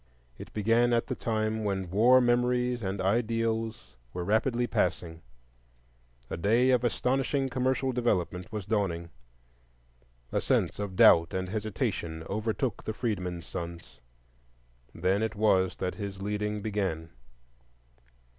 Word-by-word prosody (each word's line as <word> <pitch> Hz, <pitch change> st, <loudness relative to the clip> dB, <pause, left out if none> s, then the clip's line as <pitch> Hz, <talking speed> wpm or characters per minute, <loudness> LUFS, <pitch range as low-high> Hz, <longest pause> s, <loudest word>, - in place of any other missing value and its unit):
It -, -, -9 dB
began 115 Hz, +3 st, +2 dB
at 115 Hz, -, +2 dB
the -, -, -3 dB
time 110 Hz, -1 st, -1 dB
when 95 Hz, -4 st, -2 dB
war 120 Hz, +6 st, +6 dB
memories 125 Hz, 0 st, +1 dB
and 95 Hz, -1 st, -3 dB
ideals 115 Hz, -, -1 dB, 0.2 s
were 90 Hz, -, -3 dB
rapidly 120 Hz, +5 st, +1 dB
passing; 85 Hz, -7 st, -1 dB, 1.1 s
a -, -, -5 dB
day 115 Hz, +9 st, +3 dB
of 125 Hz, -1 st, +3 dB
astonishing 135 Hz, +2 st, 0 dB
commercial 130 Hz, +1 st, 0 dB
development 95 Hz, -7 st, -1 dB
was 105 Hz, -4 st, -4 dB
dawning; 90 Hz, -5 st, -1 dB, 1.2 s
a -, -, 0 dB
sense -, -, 0 dB
of 100 Hz, -2 st, -4 dB
doubt 85 Hz, -1 st, +6 dB
and 95 Hz, 0 st, -2 dB
hesitation 100 Hz, -6 st, -3 dB
overtook 110 Hz, +4 st, -2 dB
the 110 Hz, -, -3 dB
freedmen's 90 Hz, -7 st, -3 dB
sons,—then -, -, -6 dB
it 110 Hz, -1 st, -1 dB
was 95 Hz, -4 st, +2 dB
that 90 Hz, -, -3 dB
his 100 Hz, -2 st, -6 dB
leading 105 Hz, +1 st, -2 dB
began. 95 Hz, -7 st, -2 dB
105 Hz, 120 wpm, -29 LUFS, 90-115 Hz, 1.2 s, war